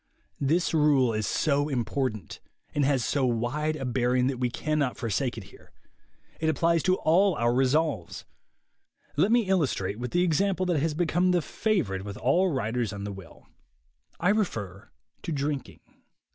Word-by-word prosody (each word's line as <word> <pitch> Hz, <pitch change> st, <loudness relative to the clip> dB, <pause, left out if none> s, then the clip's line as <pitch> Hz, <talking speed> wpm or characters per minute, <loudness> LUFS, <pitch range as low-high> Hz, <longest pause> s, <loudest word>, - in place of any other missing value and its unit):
This 165 Hz, +6 st, +1 dB
rule 145 Hz, -6 st, +3 dB
is 110 Hz, -2 st, -1 dB
so 145 Hz, +4 st, +1 dB
important, 125 Hz, -, -3 dB, 0.3 s
and 145 Hz, -, +1 dB
has 135 Hz, -4 st, +1 dB
so 140 Hz, -, 0 dB
wide 130 Hz, +6 st, 0 dB
a 135 Hz, -, -5 dB
bearing, 125 Hz, 0 st, +1 dB
that 130 Hz, -1 st, -1 dB
we 125 Hz, -1 st, +1 dB
cannot 150 Hz, 0 st, -1 dB
forsake 120 Hz, +1 st, -2 dB
it 110 Hz, -, -6 dB
here. -, -, -18 dB, 0.7 s
It 160 Hz, -, +1 dB
applies 165 Hz, +2 st, +2 dB
to 185 Hz, +3 st, +2 dB
all 185 Hz, +3 st, +3 dB
our 120 Hz, -2 st, +1 dB
resolves. 135 Hz, -, 0 dB, 0.9 s
Let 185 Hz, +9 st, +2 dB
me 240 Hz, 0 st, +5 dB
illustrate 145 Hz, -, 0 dB
with 125 Hz, 0 st, -4 dB
the 175 Hz, +8 st, +2 dB
example 185 Hz, +3 st, +1 dB
that 175 Hz, -4 st, +1 dB
has 150 Hz, +1 st, -1 dB
become 175 Hz, +2 st, +1 dB
the 180 Hz, -1 st, +3 dB
favorite 145 Hz, -, -1 dB
with 100 Hz, 0 st, -7 dB
all 175 Hz, +10 st, +2 dB
writers 120 Hz, -4 st, -1 dB
on 100 Hz, -1 st, -6 dB
will. 95 Hz, -4 st, -13 dB, 0.7 s
I 175 Hz, -, +2 dB
refer 110 Hz, -, -2 dB, 0.3 s
to -, -, -5 dB
drinking. 145 Hz, -2 st, -3 dB
140 Hz, 160 wpm, -27 LUFS, 120-165 Hz, 0.9 s, me